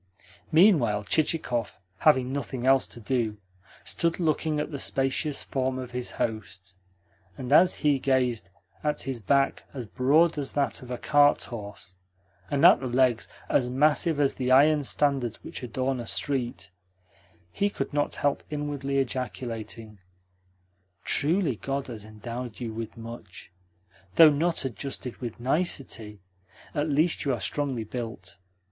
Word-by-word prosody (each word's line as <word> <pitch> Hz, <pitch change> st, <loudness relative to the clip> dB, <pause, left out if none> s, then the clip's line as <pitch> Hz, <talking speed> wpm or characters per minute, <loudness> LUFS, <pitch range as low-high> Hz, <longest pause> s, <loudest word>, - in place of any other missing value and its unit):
Meanwhile 155 Hz, -, +4 dB
Chichikov, 125 Hz, -5 st, 0 dB, 0.2 s
having 130 Hz, -4 st, +3 dB
nothing 130 Hz, -2 st, -4 dB
else 135 Hz, 0 st, +4 dB
to -, -, -10 dB
do, 115 Hz, -2 st, -1 dB, 0.5 s
stood 170 Hz, +1 st, -1 dB
looking 155 Hz, -2 st, 0 dB
at 150 Hz, -, -3 dB
the 140 Hz, -, -5 dB
spacious 135 Hz, +3 st, 0 dB
form 130 Hz, -1 st, -2 dB
of 130 Hz, -1 st, -6 dB
his 125 Hz, 0 st, -3 dB
host; 100 Hz, -4 st, -4 dB, 0.6 s
and 130 Hz, +1 st, -2 dB
as 180 Hz, +4 st, +6 dB
he 145 Hz, -2 st, +4 dB
gazed 125 Hz, -6 st, 0 dB, 0.3 s
at 150 Hz, -1 st, -1 dB
his 135 Hz, -3 st, -4 dB
back 135 Hz, +6 st, +1 dB
as 125 Hz, -3 st, -5 dB
broad 150 Hz, +8 st, +3 dB
as 140 Hz, -, -4 dB
that 140 Hz, -5 st, 0 dB
of 125 Hz, -, -11 dB
a 125 Hz, -, -3 dB
cart 145 Hz, +2 st, +4 dB
horse, 100 Hz, -4 st, -8 dB, 0.6 s
and 145 Hz, +3 st, +2 dB
at 180 Hz, -, +8 dB
the 130 Hz, -, -4 dB
legs 125 Hz, -2 st, +2 dB, 0.2 s
as 125 Hz, -2 st, +1 dB
massive 150 Hz, +4 st, +2 dB
as 140 Hz, -2 st, +3 dB
the 130 Hz, -1 st, -2 dB
iron 145 Hz, +3 st, +5 dB
standards 135 Hz, -4 st, +1 dB
which -, -, -7 dB
adorn 130 Hz, +2 st, -2 dB
a 120 Hz, -, -6 dB
street, 130 Hz, -8 st, -1 dB, 0.8 s
he 205 Hz, -, 0 dB
could 200 Hz, -, -5 dB
not 145 Hz, 0 st, 0 dB
help 145 Hz, -1 st, 0 dB
inwardly 145 Hz, -2 st, -3 dB
ejaculating: 115 Hz, -4 st, -4 dB, 1.0 s
"Truly 155 Hz, -, +2 dB
God 135 Hz, +3 st, -3 dB
has 110 Hz, -4 st, -8 dB
endowed 115 Hz, +2 st, -7 dB
you 115 Hz, -3 st, -4 dB
with 115 Hz, 0 st, -6 dB
much! 115 Hz, -6 st, -10 dB, 0.6 s
Though 160 Hz, -2 st, +9 dB
not 165 Hz, +1 st, 0 dB
adjusted 130 Hz, +1 st, -5 dB
with 120 Hz, -3 st, -6 dB
nicety, 120 Hz, -, -2 dB, 0.5 s
at 150 Hz, 0 st, -1 dB
least 155 Hz, +4 st, +2 dB
you 135 Hz, -3 st, +1 dB
are -, -, -8 dB
strongly 135 Hz, +1 st, -2 dB
built. 110 Hz, -5 st, -7 dB
130 Hz, 145 wpm, -27 LUFS, 115-145 Hz, 1.0 s, Though